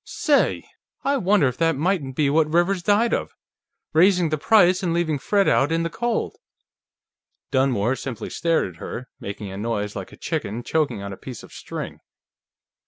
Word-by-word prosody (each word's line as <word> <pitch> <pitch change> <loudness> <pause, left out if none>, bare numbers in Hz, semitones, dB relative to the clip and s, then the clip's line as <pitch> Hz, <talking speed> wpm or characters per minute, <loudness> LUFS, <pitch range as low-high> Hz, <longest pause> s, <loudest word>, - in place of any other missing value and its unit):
Say! 290 -2 +1 0.4
I 280 +1 +2
wonder 195 - +3
if 125 - -3
that 165 -1 +2
mightn't 150 -3 -1
be 150 0 +2
what 155 0 +2
Rivers 175 +3 +2
died 210 +5 +2
of? - - -2 0.6
Raising 180 +1 +4
the 155 - 0
price 185 -1 +4
and 170 -3 0
leaving 160 -4 0
Fred 200 +7 +2
out 140 +3 +3
in 165 0 +1
the 165 - -2
cold!" 240 - -2 1.1
Dunmore 130 -3 +2
simply 130 -4 -6
stared 165 -8 +1
at 90 - -11
her, 125 +2 -7
making 100 0 -6
a 95 - -7
noise 105 -1 -2
like - - -6
a - - -13
chicken 115 +4 -3
choking 150 -10 -1
on 100 0 -5
a - - -9
piece 125 -4 -9
of - - -14
string. - - -7
160 Hz, 175 wpm, -23 LUFS, 125-185 Hz, 1.1 s, Raising